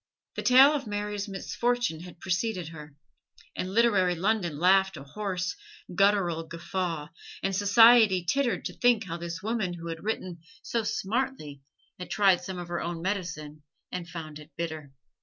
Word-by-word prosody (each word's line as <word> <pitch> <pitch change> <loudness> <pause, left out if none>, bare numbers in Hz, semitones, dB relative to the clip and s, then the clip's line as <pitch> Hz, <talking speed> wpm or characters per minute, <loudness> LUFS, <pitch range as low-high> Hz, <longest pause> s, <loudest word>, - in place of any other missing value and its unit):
The - - -3
tale 265 +4 +7
of 275 -5 -3
Mary's 205 0 -3
misfortune 235 -1 -1
had 175 0 -11
preceded 185 -2 -2
her, 150 -3 -11 0.6
and 185 - -3
literary 200 -5 +3
London 180 -4 0
laughed 190 +2 +3
a 135 - -9
hoarse, 185 - -3 0.4
guttural 195 -3 +2
guffaw, 165 -2 -4 0.3
and 195 0 0
society 205 -1 +6
tittered 270 +4 0
to - - -4
think 245 -3 +3
how 170 -3 -5
this 170 +1 -6
woman 215 -5 -1
who 170 0 -7
had 165 0 -6
written 185 -5 -3 0.2
so 235 - -1
smartly 215 - -3 0.4
had 180 -2 -7
tried 190 -1 +3
some 185 +1 -6
of 175 -1 -6
her 175 - -2
own 170 0 -4
medicine 165 -6 -4 0.3
and 175 -2 -5
found 155 -3 -7
it 150 0 -13
bitter. 160 -4 -5
185 Hz, 160 wpm, -28 LUFS, 170-210 Hz, 0.6 s, tale